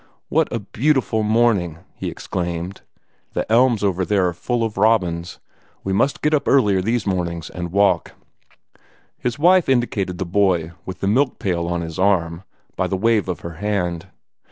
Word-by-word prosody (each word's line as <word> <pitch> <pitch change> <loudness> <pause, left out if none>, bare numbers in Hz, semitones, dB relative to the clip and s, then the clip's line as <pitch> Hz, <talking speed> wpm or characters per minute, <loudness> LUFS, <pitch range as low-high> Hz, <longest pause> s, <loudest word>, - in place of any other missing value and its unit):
"What - - +1
a - - -1
beautiful 120 +1 0
morning!" 105 -7 +2 0.2
he - - -5
exclaimed. 85 +1 -4 0.5
"The - - -1
elms 120 -2 +4
over 95 -2 +1
there 95 -1 +2
are - - -5
full 120 +7 -2
of 110 -2 -2
robins. 95 -5 +1 0.5
We 95 - -2
must 135 +8 +1
get 150 +1 +2
up 150 - +1
earlier 105 -9 +4
these 115 +3 0
mornings, 85 -4 -2
and 90 -1 -5
take 85 - -7
some 95 - -3
walks." 100 0 +3 1.1
His 125 0 -2
wife 175 +2 +4
indicated 105 -8 0
the 95 - -3
boy 90 -3 +1 0.2
with 95 0 -7
the 95 - 0
milk 130 +6 +2
pail 85 -3 -1
on 85 0 -1
his 80 0 -6
arm, 85 -4 +1 0.3
by - - 0
a - - -1
wave 105 0 +1
of 90 - -3
her 85 -1 -8
hand. 90 -5 -1
100 Hz, 180 wpm, -21 LUFS, 85-115 Hz, 1.1 s, elms